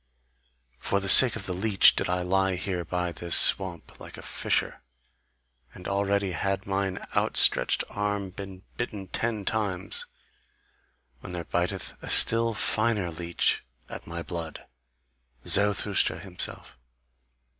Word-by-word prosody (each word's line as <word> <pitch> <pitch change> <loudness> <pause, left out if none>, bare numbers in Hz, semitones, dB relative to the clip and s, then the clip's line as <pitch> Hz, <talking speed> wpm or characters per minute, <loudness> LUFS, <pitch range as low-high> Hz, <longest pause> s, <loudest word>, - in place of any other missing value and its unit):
For 100 - -2
the 95 - -6
sake 120 +3 +11
of - - -6
the 90 - -4
leech 95 +1 +3
did - - -3
I 90 0 -2
lie 95 +1 -1
here 90 -1 -5
by 90 0 -4
this 85 0 -1
swamp, 90 -4 +1
like - - -11
a - - -12
fisher, - - -3 0.9
and 90 - -11
already 100 0 -2
had 95 +3 -4
mine 95 -1 -4
outstretched - - +2
arm 100 -2 -4
been 95 0 -11
bitten 105 -6 -6
ten 110 -2 -4
times, 100 -3 -3 1.1
when 90 - -11
there 85 -1 -6
biteth 90 +3 -4
a - - -9
still 115 0 +4
finer 110 -5 -1
leech 85 +1 -2 0.3
at - - -10
my 85 +1 -7
blood, 85 -3 -8 0.8
Zarathustra 100 -4 +1
himself! 90 -8 -5
95 Hz, 130 wpm, -25 LUFS, 90-100 Hz, 1.1 s, sake